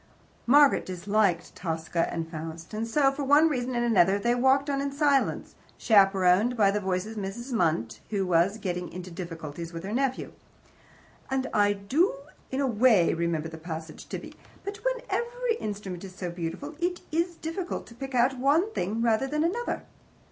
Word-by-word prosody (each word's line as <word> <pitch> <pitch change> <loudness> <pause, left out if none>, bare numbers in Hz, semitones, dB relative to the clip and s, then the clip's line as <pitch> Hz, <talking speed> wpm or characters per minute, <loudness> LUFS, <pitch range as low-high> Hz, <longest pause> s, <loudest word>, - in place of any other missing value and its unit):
Margaret 285 +2 +6
disliked 185 -1 0
TOSCA 165 -1 -2
and 165 -1 -3
FAUST. 165 +2 -8
And 220 +2 -2
so, 270 +3 +3
for 280 +1 -4
one 290 +4 +5
reason 255 -3 -2
and 240 0 +1
another, 200 -4 +4
they 235 +4 +1
walked 265 +3 +3
on 275 -1 0
in 280 0 -2
silence, 280 -1 +1 0.2
chaperoned 195 +2 +4
by 200 -3 +5
the 210 - 0
voice 185 -1 -1
of 220 0 -8
Mrs. 210 +6 -5
Munt, 155 - 0
who 200 -3 0
was 180 +4 +2
getting 180 -4 -4
into 180 +1 -8
difficulties 165 -2 -7
with 165 0 -6
her 195 - -5
nephew. 260 +2 -1 1.0
"I 220 -6 +2
do 260 - +1 0.3
in 265 - -2
a - - +2
WAY 225 -6 +4
remember 165 -2 -1
the 160 0 -9
passage, 160 -1 -7
Tibby, - - -6 0.3
but 400 +1 -5
when - - -2
every 475 0 -1
instrument 200 -4 -5
is 185 -2 -9
so 180 -2 -4
beautiful, 175 - -5
it 355 +1 -1
is 335 +2 0
difficult 340 +3 -4
to - - -14
pick 270 +2 -6
out 250 +2 +3
one 320 +11 +2
thing 215 - -1
rather 230 +3 +2
than 300 +3 0
another. 445 +9 -1
215 Hz, 175 wpm, -27 LUFS, 180-275 Hz, 1.0 s, Margaret